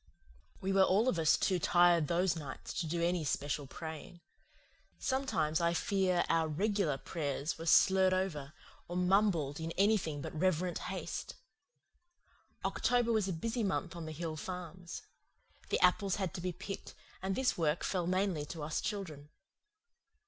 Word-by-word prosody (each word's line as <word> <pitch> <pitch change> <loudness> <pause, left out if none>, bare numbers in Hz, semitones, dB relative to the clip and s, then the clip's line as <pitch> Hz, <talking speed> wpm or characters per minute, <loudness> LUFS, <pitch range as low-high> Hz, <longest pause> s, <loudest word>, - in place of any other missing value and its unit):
We 195 +1 0
were 195 - +5
all 195 +5 +4
of 195 -10 +1
us 160 -1 +4
too 185 -2 +1
tired 175 -2 +4
those 175 +2 +2
nights 145 -5 -7
to 165 - -3
do 170 +2 -1
any 175 -1 +1
special 145 0 -2
praying. 160 +2 -8 0.8
Sometimes 260 - 0
I 170 0 +2
fear 185 -1 +1
our 165 -1 +2
"regular" 185 -2 0
prayers 145 +1 -3
were 165 - -6
slurred 190 +3 +5
over, 175 -7 -1 0.4
or 175 - -5
mumbled 180 -6 +2
in 160 0 -3
anything 195 -7 +2
but - - -6
reverent 180 +1 0
haste. - - -5 1.3
October 245 -1 +2
was 215 -3 +2
a - - -1
busy 230 +8 -2
month 190 -3 -1
on 165 -2 -6
the - - -5
hill 160 0 -4
farms. 180 +1 -7 0.7
The - - +1
apples 190 +1 +3
had 190 -6 -2
to - - -5
be 180 +1 -1
picked, 190 +3 -7 0.3
and 190 +1 -1
this 265 -1 +1
work 160 -1 0
fell 180 -3 -1
mainly 185 -4 +1
to 155 0 -6
us 150 +1 -2
children. 160 -9 -5
175 Hz, 155 wpm, -33 LUFS, 160-190 Hz, 1.3 s, were